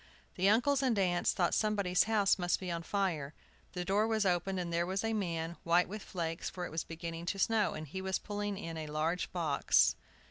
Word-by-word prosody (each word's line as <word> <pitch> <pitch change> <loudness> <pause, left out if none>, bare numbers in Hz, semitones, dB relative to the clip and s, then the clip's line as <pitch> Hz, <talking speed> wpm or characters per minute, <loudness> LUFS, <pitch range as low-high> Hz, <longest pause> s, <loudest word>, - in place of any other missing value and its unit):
The 190 +1 +2
uncles 250 +6 +3
and 250 -5 +1
aunts 180 -3 +2
thought 175 - +1
somebody's 200 -4 +2
house 210 -3 +3
must 175 -1 +1
be 185 -2 -4
on 170 -1 -2
fire. 165 -6 -2 0.4
The 180 -1 -3
door 205 +4 +2
was 220 -2 +1
opened, 185 +1 +1
and 170 -1 -3
there 170 +1 +1
was 190 +2 -1
a 225 0 0
man, 170 -5 -2
white 170 +1 +3
with 210 +2 -6
flakes, 165 -3 -4
for 180 -1 -5
it - - -7
was 160 +1 -2
beginning 165 +1 -6
to 195 - -1
snow, 215 +1 +2
and 155 0 -6
he 190 +7 -5
was 190 0 0
pulling 205 -1 -4
in 165 -4 -6
a 155 -1 -5
large 155 +4 -1
box. 165 -5 +3
180 Hz, 215 wpm, -33 LUFS, 170-205 Hz, 0.4 s, uncles